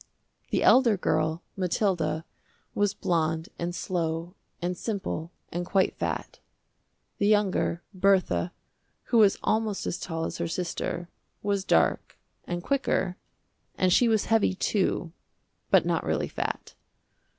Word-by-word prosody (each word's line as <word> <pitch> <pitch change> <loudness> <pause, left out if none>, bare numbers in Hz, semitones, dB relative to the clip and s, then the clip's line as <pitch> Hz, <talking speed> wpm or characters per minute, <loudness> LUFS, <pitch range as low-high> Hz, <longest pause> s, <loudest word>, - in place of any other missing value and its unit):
The - - +1
elder 240 -5 +6
girl, 160 -2 0
Mathilda, 175 -4 0 0.5
was 205 -1 +1
blonde, 165 -4 0
and 175 +1 -2
slow, 170 -1 -2 0.3
and 180 +1 -2
simple, 190 -6 -3 0.2
and 175 +1 -2
quite 190 +1 +1
fat. - - -3 0.8
The 205 - +3
younger, 200 -5 +2
Bertha, 185 - +2 0.5
who 235 - +2
was 205 -3 +5
almost 215 -2 0
as - - -2
tall 165 -2 -3
as - - -5
her 170 - -1
sister, 175 0 -3 0.4
was 200 -1 0
dark, - - +2 0.3
and 175 0 -4
quicker, 225 -9 0 0.6
and 185 -1 +3
she 245 - +5
was 220 -2 +2
heavy, 225 -4 +3
too, 185 -4 0 0.6
but - - +5
not - - +1
really - - -1
fat. - - -4
185 Hz, 130 wpm, -27 LUFS, 170-205 Hz, 0.8 s, elder